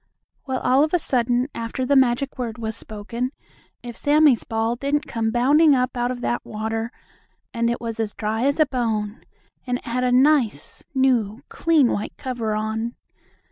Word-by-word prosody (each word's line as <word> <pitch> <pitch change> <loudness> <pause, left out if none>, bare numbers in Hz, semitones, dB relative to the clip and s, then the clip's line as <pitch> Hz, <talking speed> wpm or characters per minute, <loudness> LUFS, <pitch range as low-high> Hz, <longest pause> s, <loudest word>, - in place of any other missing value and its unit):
Well, 260 -1 -2
all 260 +3 +4
of 310 +3 +1
a - - +5
sudden, 245 -4 0
after 230 +3 -3
the 280 - +2
magic 260 +1 +2
word 235 -3 -3
was 220 -2 -4
spoken, 230 +4 -5 0.5
if 240 -1 -7
Sammie's 290 -3 +4
ball 225 +1 -1
didn't 285 +4 -1
come 225 -4 -1
bounding 280 +6 +4
up 255 0 0
out 245 0 0
of 250 -1 -4
that 240 - -1
water, 225 +2 -3 0.6
and 235 -1 +1
it 235 - -1
was 230 -1 -5
as 215 -2 -2
dry 220 +3 -1
as 280 +2 0
a 310 - +6
bone, 225 -5 -2 0.4
and 245 0 0
it - - -16
had 250 +2 -1
a 250 - +2
nice, 255 - +2
new, 250 -3 +1
clean, 315 -7 +3
white 205 - -3
cover 235 -4 -3
on. 220 +2 -2
240 Hz, 180 wpm, -23 LUFS, 225-265 Hz, 0.6 s, a